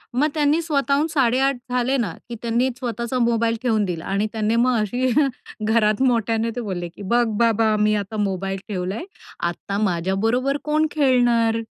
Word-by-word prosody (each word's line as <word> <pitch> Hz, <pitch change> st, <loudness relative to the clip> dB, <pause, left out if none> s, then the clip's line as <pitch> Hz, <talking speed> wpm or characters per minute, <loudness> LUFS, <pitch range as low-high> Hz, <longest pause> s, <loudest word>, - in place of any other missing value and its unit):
मग 290 Hz, +4 st, +3 dB
त्यांनी 300 Hz, +1 st, +2 dB
स्वतःहून 290 Hz, -1 st, +1 dB
8.30 270 Hz, -1 st, +2 dB
झाले 250 Hz, +2 st, +1 dB
ना, 215 Hz, -10 st, -1 dB, 0.2 s
की 235 Hz, -, -5 dB
त्यांनी 235 Hz, +2 st, +1 dB
स्वतःचा 235 Hz, 0 st, -3 dB
मोबाईल 230 Hz, -1 st, +2 dB
ठेवून 220 Hz, -4 st, +2 dB
दिला 170 Hz, -3 st, -4 dB
आणि 200 Hz, +2 st, 0 dB
त्याने 220 Hz, 0 st, 0 dB
मग 245 Hz, +2 st, +3 dB
अशी 250 Hz, +5 st, 0 dB, 0.6 s
घरात 220 Hz, +1 st, +2 dB
मोठ्याने 230 Hz, -2 st, +1 dB
ते 245 Hz, -, -3 dB
बोलले 185 Hz, -5 st, -4 dB
की, 185 Hz, -, -14 dB
"बघ 235 Hz, +5 st, +2 dB
बाबा, 225 Hz, -2 st, +3 dB
मी 210 Hz, 0 st, +3 dB
आता 205 Hz, +1 st, -4 dB
मोबाईल 195 Hz, -1 st, -1 dB
ठेवलाय, 195 Hz, -, -3 dB, 0.5 s
आता 195 Hz, +3 st, -5 dB
माझ्याबरोबर 215 Hz, +9 st, 0 dB
कोण 305 Hz, +1 st, +1 dB
खेळणार? 240 Hz, -5 st, +3 dB
230 Hz, 160 wpm, -22 LUFS, 210-255 Hz, 0.6 s, मग